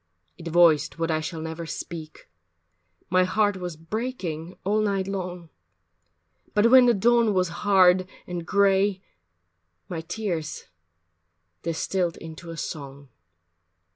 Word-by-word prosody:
It 170 - -10
voiced 160 -3 +4
what 165 0 -1
I 155 - +1
shall 160 +1 -5
never 160 +1 -5
speak, 160 -2 -7 0.8
My 185 0 +5
heart 205 +2 +1
was 180 -2 -5
breaking 180 -3 -5
all 210 +3 +1
night 195 -2 0
long, 180 -4 -5 1.0
But 215 +3 +4
when 255 -1 +8
the 240 - +4
dawn 230 0 +3
was 185 -2 +2
hard 185 -2 +4 0.2
and 175 -1 -5
gray, 195 +1 +2 0.8
My 165 -2 -4
tears 165 -4 -4 1.0
distilled 170 +1 -1
into 165 +1 -10
a 165 - -7
song. 140 -3 -7
180 Hz, 120 wpm, -25 LUFS, 165-200 Hz, 1.0 s, when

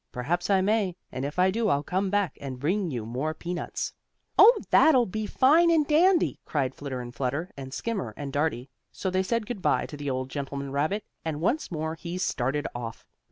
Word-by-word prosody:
Perhaps 170 +10 -2
I 195 -1 +4
may, 200 -2 +1 0.2
and 130 - -4
if 145 +4 -4
I 185 +1 +4
do 225 +1 0
I'll 140 -4 +2
come 190 +4 -1
back 200 -5 0
and 130 -3 -6
bring 180 +6 0
you 120 -6 -4
more 135 +7 -2
peanuts." 175 +1 -4 0.4
"Oh, 455 +1 +8
that'll 260 -6 +6
be 215 +2 -3
fine 315 +9 +5
and 320 -3 +4
dandy!" 335 +4 +3
cried 135 -4 -1
Flitter 135 -3 -5
and 120 0 -8
Flutter, 140 +8 -2
and 135 -1 -8
Skimmer 195 - -3
and 140 -2 -5
Dartie. 145 -3 -1 0.2
So 190 - -3
they 185 +1 +2
said 230 +3 -1
good 220 -4 -5
by - - +2
to - - -8
the 145 -1 -4
old 130 0 -3
gentleman 140 -1 -4
rabbit, 155 +10 0 0.2
and 155 -2 -3
once 245 - 0
more 160 -1 -3
he 170 +2 -6
started 145 -4 -1
off. 115 -2 -6
165 Hz, 205 wpm, -27 LUFS, 140-205 Hz, 0.4 s, Oh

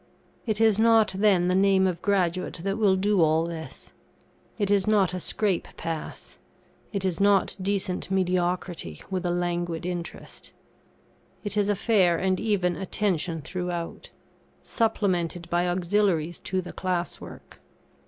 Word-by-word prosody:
It 215 -1 0
is 220 -2 +4
not, 225 -2 +4
then, 190 -3 +3
the 180 - +2
name 190 0 +4
of 180 -2 -1
graduate 185 -4 0
that 195 +2 -2
will 200 -3 +4
do 200 0 +2
all 160 0 +3
this. 165 -1 -8 0.6
It 205 -2 0
is 200 -1 +2
not 200 -4 +3
a 185 - -2
scrape 195 0 0
pass; 165 -1 -6 0.5
it 195 -2 -2
is 180 -3 -1
not 200 -1 +3
decent 190 -2 -1
mediocrity 180 - -1
with 185 -1 -1
a - - 0
languid 175 -1 -2
interest. 175 -1 -6 0.9
It 205 -1 -3
is 205 -1 +2
a 205 - +2
fair 190 -5 +3
and 185 +1 0
even 190 -5 0
attention 180 -4 -1
throughout, 180 -2 -5 0.5
supplemented 180 -7 0
by 175 +1 +2
auxiliaries 175 -2 0
to 185 0 -1
the 180 - -9
class 180 -2 -2
work. - - -12
185 Hz, 145 wpm, -26 LUFS, 175-200 Hz, 0.9 s, is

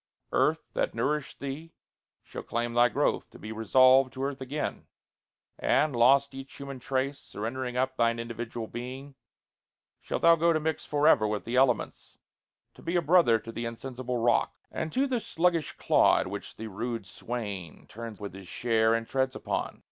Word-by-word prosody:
Earth, - - +2
that - - -1
nourished 150 -1 -1
thee, 145 +4 -6 0.5
shall - - -7
claim 120 0 -2
Thy 120 +1 +5
growth, - - 0
to - - -14
be 110 - -8
resolved 130 +4 +5
to 130 - -4
earth 140 -1 -3
again, 145 +3 -4 0.7
And, 150 -3 +2
lost 135 +4 +4
each 135 0 -9
human 140 -2 -7
trace, 135 +2 -1
surrendering 125 +3 -5
up 130 +1 0
Thine 115 0 +2
individual 115 0 -5
being, 130 +5 -7 0.9
shalt - - -4
thou 170 0 +8
go 170 +1 +3
To 155 - +1
mix 155 0 -3
for 150 0 +2
ever 110 - +5
with 105 -1 -3
the 120 - -3
elements, 130 -3 +1 0.6
To - - -16
be 170 +2 -3
a 175 - +3
brother 155 -7 +5
to 115 +1 -9
the 115 +1 -4
insensible 125 +1 -4
rock 120 0 +2 0.2
And 160 - -3
to 265 - +2
the 255 -3 0
sluggish 170 -5 0
clod, - - +3
which - - -7
the 110 - -7
rude 115 +1 -4
swain 100 -5 -6
Turns 115 -1 -8
with 100 -3 -6
his 95 -1 -11
share, 115 +2 +2
and 115 0 -3
treads 130 -1 0
upon. - - -3
125 Hz, 175 wpm, -28 LUFS, 115-140 Hz, 0.9 s, thou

